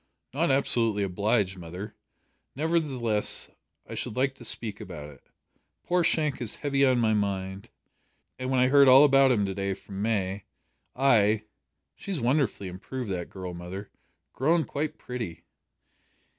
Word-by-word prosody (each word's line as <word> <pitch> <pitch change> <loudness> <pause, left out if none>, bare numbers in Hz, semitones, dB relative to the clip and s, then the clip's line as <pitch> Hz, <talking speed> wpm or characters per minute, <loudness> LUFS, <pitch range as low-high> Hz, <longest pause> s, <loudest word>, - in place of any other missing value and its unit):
"Not 165 +5 +1
absolutely 115 -6 +3
obliged, 100 0 0
mother. 90 +5 -8 0.6
Nevertheless, 135 -8 0 0.4
I - - -8
should - - -4
like 135 +1 +1
to 135 - -14
speak 110 -2 -3
about 75 -1 -8
it. 70 - -18 0.6
Poor 180 0 +1
Shank 150 -5 +1
is 115 - -3
heavy 140 -2 0
on 130 -2 +4
my 110 -2 +2
mind, 100 -2 -2 0.7
and 130 0 -3
when 130 -1 +2
I 125 0 +4
heard 140 0 +6
all 130 +2 +9
about 135 -2 +5
him 105 -5 +2
to 95 - -3
day 100 0 -2
from 100 0 -8
May, 100 -3 -1 0.5
I. 110 -5 +3 0.5
She's 195 -5 -5
wonderfully 125 -5 0
improved, 100 +5 -6
that 90 -2 -4
girl, 95 -2 -7
mother. 90 +4 -8 0.4
Grown 160 +5 +2
quite 150 +1 -4
pretty?" 95 -10 -6
115 Hz, 145 wpm, -27 LUFS, 95-135 Hz, 0.7 s, all